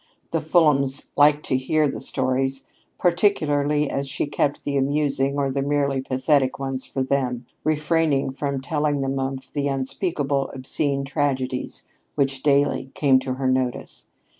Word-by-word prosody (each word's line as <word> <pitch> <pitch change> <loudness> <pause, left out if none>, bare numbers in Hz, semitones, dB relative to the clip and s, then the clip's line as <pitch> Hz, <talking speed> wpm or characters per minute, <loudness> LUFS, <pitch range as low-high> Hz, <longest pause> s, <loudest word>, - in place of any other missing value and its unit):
The 165 - 0
Fulhams 145 -4 +2
liked 145 +1 +4
to - - 0
hear 150 +4 +1
her - - -6
stories, 135 0 -1 0.3
particularly 150 -6 +2
as 140 0 -2
she 135 - -2
kept 145 0 -1
the 145 - -2
amusing 140 0 +1
or 140 -1 0
the 135 +1 -1
merely 140 -1 0
pathetic 130 +1 +1
ones 135 -1 -3
for 135 - -2
them, 130 -2 -1 0.2
refraining 155 -2 +1
from 140 0 -3
telling 145 -1 0
them 135 0 -1
of 135 0 -4
the 145 -1 0
unspeakable, 140 +1 -1
obscene 140 +1 -1
tragedies 135 -3 -2 0.3
which 135 -2 0
daily 140 -2 +2
came 135 -3 +4
to 130 -1 -3
her 130 0 -1
notice. 130 -1 -2
140 Hz, 145 wpm, -23 LUFS, 135-145 Hz, 0.3 s, liked